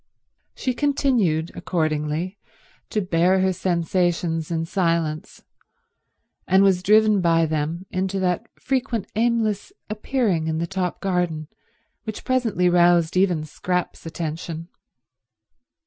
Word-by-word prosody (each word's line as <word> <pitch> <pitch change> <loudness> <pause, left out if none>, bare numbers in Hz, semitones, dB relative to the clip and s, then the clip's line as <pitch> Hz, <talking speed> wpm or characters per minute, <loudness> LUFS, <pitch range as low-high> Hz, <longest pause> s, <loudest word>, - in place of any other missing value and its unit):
She 255 - -1
continued, 240 - +1
accordingly, 155 +2 -2 0.5
to 215 - 0
bear 185 +1 +2
her 190 0 +2
sensations 175 -2 0
in 165 -1 -1
silence, 165 -1 -1 1.0
and 190 +1 +5
was 190 -2 +3
driven 210 +1 +4
by 165 -1 +3
them 160 +3 -2
into 190 +1 -1
that 180 -2 0
frequent 255 -5 -1
aimless 225 - 0 0.2
appearing 210 -7 0
in 160 0 -1
the 165 - -1
top 180 0 -3
garden 175 -5 -1 0.6
which 220 -2 -6
presently 235 -8 +1
roused 175 -1 +4
even 180 -4 +2
Scrap's 180 +4 -3
attention. 165 0 -5
180 Hz, 110 wpm, -23 LUFS, 165-200 Hz, 1.0 s, and